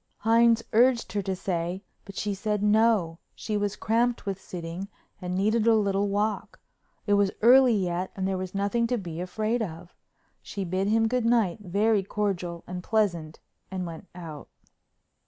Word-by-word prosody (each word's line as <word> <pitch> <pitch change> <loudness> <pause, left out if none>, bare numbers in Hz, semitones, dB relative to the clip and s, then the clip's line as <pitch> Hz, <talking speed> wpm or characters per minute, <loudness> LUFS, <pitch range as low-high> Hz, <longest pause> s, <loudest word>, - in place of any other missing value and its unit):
Hines 230 +1 +4
urged 235 -2 +3
her 205 - 0
to 190 0 -2
stay 180 +1 -3 0.2
but 195 - -11
she 205 -1 -2
said 210 +1 -2
no, 210 -6 +3 0.2
she 215 - -4
was 205 -1 -1
cramped 235 +2 0
with 195 -1 -4
sitting 175 +2 -6 0.3
and 180 0 -3
needed 215 +4 +1
a 230 - +6
little 200 -1 +1
walk; 205 +1 -2 0.5
it 205 - +2
was 200 -1 +4
early 250 0 +7
yet 180 -1 -1
and 190 -1 -2
there 190 - -1
was 185 +1 -6
nothing 205 +4 +1
to 245 +1 0
be 170 -5 -6
afraid 215 +6 -1
of. 175 -3 -6 0.5
She 200 - -5
bid 185 +3 -1
him 225 +1 +3
good 250 +1 0
night 225 -6 +2
very 205 +2 +1
cordial 185 -4 -3
and 180 0 -6
pleasant 170 -8 -1 0.3
and 185 -1 -4
went 170 +3 -8
out. 160 -5 -9
200 Hz, 170 wpm, -27 LUFS, 180-220 Hz, 0.5 s, early